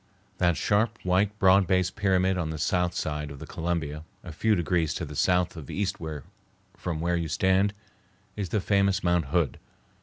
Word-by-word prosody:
That 85 -2 +2
sharp, 110 +3 +1
white, 95 +3 +1
broad 95 -1 +5
based 95 -1 +1
pyramid 95 -2 +2
on 85 -3 -2
the 80 - -4
south 90 +3 0
side 75 -1 -3
of 70 - -9
the - - -8
Columbia, 80 -3 -3 0.2
a 90 - -8
few 110 +7 +1
degrees 85 -2 0
to - - -3
the 75 - -9
south 90 +4 +2
of 80 -5 -9
east 100 -1 -2 0.8
from 85 -3 -4
where 85 +2 0
you 85 -1 -1
stand, 95 +5 +2 0.6
is 100 -4 -3
the 105 - 0
famous 100 0 +2
Mount 85 -2 +2
Hood. 80 +2 0
90 Hz, 180 wpm, -27 LUFS, 80-95 Hz, 0.8 s, broad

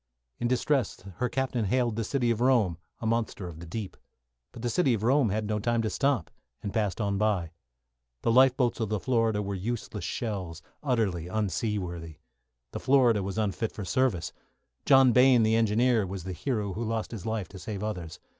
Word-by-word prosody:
In 120 - 0
distress, 130 -1 0 0.2
her 125 0 0
captain 130 -4 -1
hailed 120 +1 +1
"The 115 - -1
City 120 0 0
of 115 0 -1
Rome," 115 -10 +3 0.2
a - - -4
monster 110 -4 -1
of 80 -2 -9
the 85 - -9
deep. 100 +2 -5 0.6
But 115 - -10
"The 120 - 0
City 135 -7 +3
of 110 - -5
Rome" 130 0 +3
had 105 +2 -1
no 105 0 -1
time 115 +2 0
to 110 - -1
stop, 135 - 0 0.3
and 100 - -4
passed 105 -3 0
on 100 -2 0
by. 100 -6 +1 0.7
The - - +2
lifeboats 130 0 +4
of 110 -3 -1
the 105 -1 0
"Florida" 115 -4 +1
were 100 0 -3
useless 105 +1 -4
shells, 95 -7 -4 0.2
utterly 110 - 0
unseaworthy. 95 -5 -2 0.6
The - - -5
"Florida" 130 -6 +4
was 95 +2 -4
unfit 110 +1 -1
for 100 - -6
service. 115 -6 0 0.5
John 135 -2 +7
Bayne, 125 -1 +6
the 110 +1 +3
engineer, 115 0 +3
was 95 -1 -6
the 95 +1 -5
hero 100 - -2
who 110 +5 -3
lost 110 -1 -2
his 110 -3 -6
life 110 -5 -2
to 95 - -10
save 100 +1 -5
others. 90 -5 -5
110 Hz, 190 wpm, -28 LUFS, 100-120 Hz, 0.7 s, John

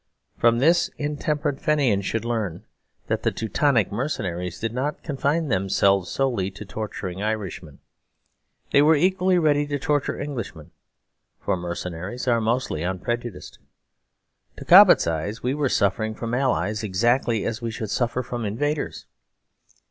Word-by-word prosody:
From 115 0 +3
this 165 +7 +3
intemperate 145 -1 -2
Fenians 130 -11 +1
should 115 0 -2
learn 110 -8 -2 0.4
that - - -1
the - - +2
Teutonic 115 0 +1
mercenaries 95 - -3
did 115 0 -3
not 140 +4 -3
confine 150 +3 0
themselves 95 -2 +2
solely 120 -9 0
to 100 +2 -10
torturing 100 -3 -5
Irishmen. 100 -8 -4 0.9
They 140 - +5
were 155 +2 +5
equally 185 +3 +2
ready 145 -3 +2
to 145 -1 -1
torture 145 0 -1
Englishmen: 110 - -6 0.7
for - - -1
mercenaries 90 +6 -5
are 120 -2 +3
mostly 115 - -1
unprejudiced. 95 +5 -4 1.0
To - - -9
Cobbett's - - +8
eye 80 +5 -2
we 125 +2 0
were 145 -2 0
suffering 110 +2 0
from 115 +1 -5
allies 120 -5 0
exactly 115 +2 +1
as 115 0 -3
we 115 - -2
should 110 -2 -5
suffer 125 +1 0
from 120 -1 -5
invaders. 145 +9 -2
115 Hz, 135 wpm, -24 LUFS, 100-140 Hz, 1.0 s, Cobbett's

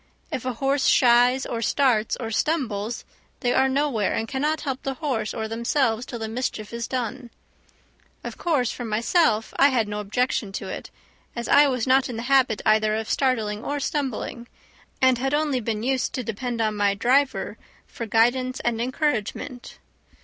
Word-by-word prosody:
If 255 - -4
a 255 - -1
horse 270 +3 +1
shies, 245 +1 +4
or 230 - -3
starts, 230 -3 +2
or 225 -3 -5
stumbles, 230 -5 -1 0.4
they 245 -3 +1
are 265 0 +3
nowhere, 265 -7 0
and 225 - -2
cannot 295 +4 -1
help 270 -3 -3
the 270 -1 -3
horse 255 -8 -2
or 220 -1 -3
themselves 235 +1 0
till 240 - -5
the 220 -1 -4
mischief 225 -2 -4
is 235 -1 -3
done. 250 0 -4 0.9
Of - - -6
course, 285 -9 0
for 245 - -6
myself 225 +1 +1
I 275 - +8
had 245 -6 +1
no 210 0 -4
objection 210 0 -1
to - - -5
it, - - -6 0.5
as 235 -1 -4
I 290 +1 +6
was 250 -4 -1
not 260 0 +3
in 240 - -5
the 230 - -4
habit 260 -4 +2
either 215 0 +3
of 220 0 -3
starting 220 -5 0
or 290 0 -2
stumbling, 265 -4 -3 0.6
and 260 -2 +5
had 270 +3 0
only 295 -4 +1
been 220 -2 -3
used 260 0 0
to 255 - -3
depend 230 +2 -3
on 215 -1 0
my 205 -1 +2
driver 260 +6 +1 0.3
for 230 - -7
guidance 250 +4 +2
and 235 -1 -1
encouragement. 250 -2 -2
245 Hz, 175 wpm, -24 LUFS, 225-265 Hz, 0.9 s, I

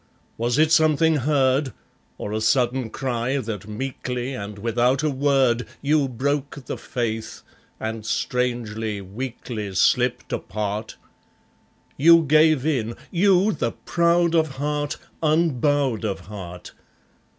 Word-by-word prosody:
Was 120 +3 0
it 155 +1 +4
something 160 0 +4
heard, 135 -1 +1 0.4
Or 105 - -5
a 110 - -1
sudden 125 +1 +1
cry, 125 +1 -2
that 110 -5 -5
meekly 125 +2 -4
and 100 -4 -6
without 120 +6 +1
a 155 - +1
word 130 -3 +2
You 145 0 +2
broke 140 +2 -2
the - - -4
faith, 115 -3 -4 0.4
and 110 0 -4
strangely, 115 -3 -2
weakly, 105 0 -6
slipped - - +2
apart. 105 +1 -3 1.0
You 165 +3 +7
gave 155 -1 +4
in 120 -7 0 0.2
you, 195 +2 +4
the 120 - -2
proud 170 0 +1
of 160 -4 +1
heart, 145 +1 -2 0.2
unbowed 145 -6 +1
of 100 -3 -2
heart! 90 -4 -9
130 Hz, 115 wpm, -23 LUFS, 110-150 Hz, 1.0 s, You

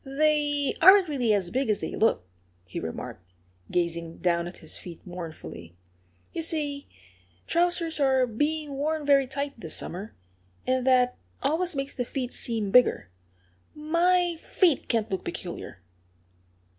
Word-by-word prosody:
"They 290 0 +1
aren't 380 0 +8
really 250 -6 +1
as 195 -4 +1
big 260 0 0
as 210 - +2
they - - -4
look," 215 - +1 0.4
he 90 - -5
remarked, 85 +2 -7 0.4
gazing 170 -1 -2
down 170 -1 +1
at 175 - -9
his - - -7
feet 170 -2 -9
mournfully. 160 - -8 0.6
"You - - -2
see, 295 -3 0 0.6
trousers 340 -2 +1
are 265 -2 +4
being 295 +5 -2
worn 300 +2 -1
very 275 -2 +4
tight 280 -1 -4
this 160 -7 -4
summer. 195 +5 -6 0.5
And 255 0 0
that 250 -1 +3 0.2
always 325 +5 +1
makes 275 0 -3
the 250 - -2
feet 250 0 -4
seem 220 -5 -1
bigger.... 225 - +4 0.6
My 340 +3 +2
feet 340 -5 +1
can't 225 -3 0
look 190 -1 -2
peculiar." 175 - -6
265 Hz, 140 wpm, -27 LUFS, 190-305 Hz, 0.6 s, aren't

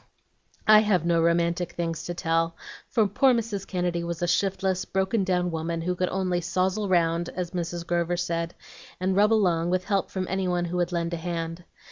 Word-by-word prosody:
"I 215 0 +8
have 200 -6 +2
no 170 -1 +3
romantic 170 +1 +1
things 165 -1 -3
to 175 - -4
tell, 165 0 0 0.3
for 225 -5 +2
poor 250 +6 +3
Mrs. 215 -4 -3
Kennedy 175 -2 -1
was 170 0 -4
a - - +1
shiftless, 190 0 +1
broken 195 +2 0
down 180 -1 0
woman, 165 +1 -2
who 180 +2 -1
could 180 0 -1
only 185 -2 -1
'sozzle 190 +4 0
round,' 170 -1 +2
as 180 -2 -4
Mrs. 175 -1 -4
Grover 175 0 0
said, 170 -1 -2 0.4
and 185 +1 0
rub 210 +2 +4
along 175 -6 +2
with 185 0 +1
help 195 -1 0
from 185 -1 -3
any 190 0 -1
one 175 -1 0
who 175 +1 -3
would 175 0 0
lend 170 -1 -1
a - - -1
hand. 165 0 -4
175 Hz, 195 wpm, -26 LUFS, 170-190 Hz, 0.4 s, I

